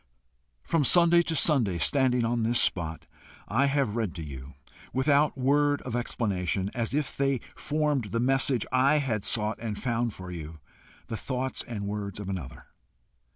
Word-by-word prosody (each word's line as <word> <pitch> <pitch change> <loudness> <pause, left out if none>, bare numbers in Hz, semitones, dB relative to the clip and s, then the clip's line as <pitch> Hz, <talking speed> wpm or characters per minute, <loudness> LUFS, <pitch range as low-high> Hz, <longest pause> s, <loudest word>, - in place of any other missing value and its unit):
From 165 -3 +1
Sunday 170 +4 +5
to 165 -1 -2
Sunday, 125 - +2
standing 125 - +2
on 120 0 0
this 115 +2 +2
spot, 80 -3 0 0.4
I 135 +6 +2
have 135 -6 0
read 110 -6 -2
to 85 - -5
you, 65 -1 -9 0.4
without 140 +2 +2
word 145 +2 +2
of 125 -2 -4
explanation, 100 -5 -1
as 115 +2 -2
if 150 -2 -1
they 135 -1 +1 0.2
formed 150 -4 0
the 115 +3 -2
message 130 -1 +2
I 130 +3 +4
had 120 -8 -1
sought 110 -1 -1
and 110 -3 -4
found 120 -3 -1
for 95 -1 -8
you, 80 -2 -7 0.5
the 110 - -5
thoughts 130 +2 -3
and 105 -4 -5
words 100 0 -4
of 100 -2 -5
another. 90 -10 -6
120 Hz, 160 wpm, -28 LUFS, 100-140 Hz, 0.5 s, Sunday